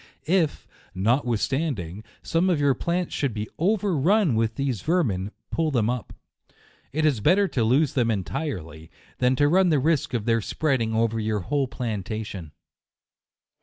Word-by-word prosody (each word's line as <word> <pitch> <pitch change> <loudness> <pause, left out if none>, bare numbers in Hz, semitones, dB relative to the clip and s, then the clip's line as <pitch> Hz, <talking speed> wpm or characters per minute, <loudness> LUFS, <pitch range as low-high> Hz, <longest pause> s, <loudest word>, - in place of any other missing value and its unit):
If, 165 -2 +1 0.3
notwithstanding, 115 - -1 0.2
some 170 +3 +1
of 170 -5 +2
your 140 -1 +3
plants 170 +6 -2
should 135 -6 -1
be 105 0 -3
over 200 +1 +1
run 175 - +3
with 115 0 0
these 135 -7 -2
vermin, 120 - 0 0.2
pull 165 -1 0
them 120 -5 +1
up. 125 -2 -5 0.8
It 155 +2 0
is 145 -7 +2
better 195 - +4
to 120 - 0
lose 135 +7 +2
them 120 -3 +1
entirely, 90 - -4 0.3
than 125 +1 +3
to 145 +3 +3
run 180 +4 +4
the 155 - +3
risk 145 -2 +1
of 110 -3 -2
their 115 -1 +2
spreading 120 -3 0
over 115 0 +1
your 105 -1 -1
whole 140 +7 0
plantation. 105 -7 -5
125 Hz, 155 wpm, -25 LUFS, 110-155 Hz, 0.8 s, better